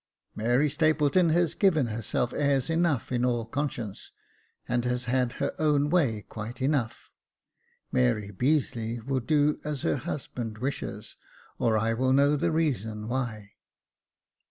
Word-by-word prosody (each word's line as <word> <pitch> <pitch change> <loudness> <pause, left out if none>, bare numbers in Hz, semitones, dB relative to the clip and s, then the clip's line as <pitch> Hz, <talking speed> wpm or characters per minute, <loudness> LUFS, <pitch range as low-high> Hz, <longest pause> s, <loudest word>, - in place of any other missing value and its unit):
*' - - -64
Mary 120 +7 +2
Stapleton 155 +2 +3
has 170 0 +2
given 165 -9 +3
herself 115 +1 -2
airs 140 -1 +1
enough 165 -8 +1
in 125 -1 0
all 120 -2 +1
conscience, 120 -5 -4 0.6
and 120 -1 0
has 125 0 -1
had 125 0 +1
her 140 - -2
own 150 -1 +2
way 120 - +2
quite 110 +3 -7
enough. 130 -4 -1 0.8
Mary 100 +12 +1
Beazeley 120 -1 0
will 135 -1 0
do 150 +3 +1
as 150 -2 -4
her - - +1
husband 120 -4 -5
wishes, 135 +5 -4 0.4
or 110 -2 +2
I 110 +1 +1
will 130 +3 +1
know 140 +2 +4
the 145 - 0
reason 110 - -1
why." 115 -5 -3
130 Hz, 140 wpm, -27 LUFS, 115-150 Hz, 0.8 s, know